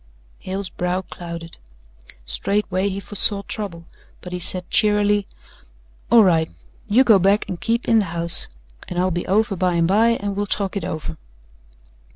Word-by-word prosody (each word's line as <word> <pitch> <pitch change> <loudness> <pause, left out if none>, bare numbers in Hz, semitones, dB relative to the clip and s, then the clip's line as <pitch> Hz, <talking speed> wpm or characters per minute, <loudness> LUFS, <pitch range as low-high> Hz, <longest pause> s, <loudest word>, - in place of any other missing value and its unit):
Hale's 190 0 -5
brow 180 +1 -2
clouded. 170 -2 -9 0.7
Straightway 195 - 0
he 195 0 -4
foresaw 200 0 +2
trouble 185 -6 -5 0.3
but 180 - -9
he 180 - -3
said 180 0 -2
cheerily: 205 -1 +2 0.8
"All 230 -1 +7
right. 165 -4 +2 0.4
You 240 +6 +4
go 220 -6 +5
back 195 +3 +2
and 185 -4 -6
keep 230 +1 -1
in 225 - +4
the 205 - 0
house 170 -1 +3 0.4
and 175 - -6
I'll 185 +1 +1
be 175 +1 -3
over 205 +1 +1
by 180 -1 0
and 170 -1 +2
by 220 +5 +3
and 200 0 -4
we'll 205 +1 -2
talk 195 -1 -1
it 200 - -3
over." 145 - -5
195 Hz, 165 wpm, -21 LUFS, 175-205 Hz, 0.8 s, All